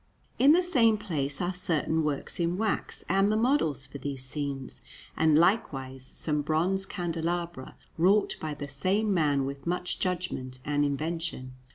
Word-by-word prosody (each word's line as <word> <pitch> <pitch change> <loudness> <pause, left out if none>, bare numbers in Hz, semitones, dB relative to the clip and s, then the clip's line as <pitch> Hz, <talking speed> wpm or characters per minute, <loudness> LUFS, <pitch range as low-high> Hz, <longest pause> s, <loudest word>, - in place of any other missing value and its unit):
In 280 +4 +7
the 360 +2 +4
same 235 -11 +4
place 145 -9 -2
are 180 +2 -1
certain 160 -2 0
works 150 +2 -2
in 170 +1 0
wax 220 0 -1
and 195 +3 +3
the - - +2
models 220 - +1
for 140 +1 -9
these 135 -2 -5
scenes, 140 -1 -4 0.3
and 155 -1 +4
likewise 135 - +1
some 150 +3 -2
bronze 175 +6 +1
candelabra 170 -3 -3 0.2
wrought 195 +5 +4
by 155 -1 -3
the 145 -1 -6
same 195 +9 +1
man 145 -6 +2
with 140 +2 -6
much 180 +1 -1
judgment 175 -8 -2
and 145 0 +1
invention. 150 -2 -2
160 Hz, 155 wpm, -28 LUFS, 140-185 Hz, 0.3 s, In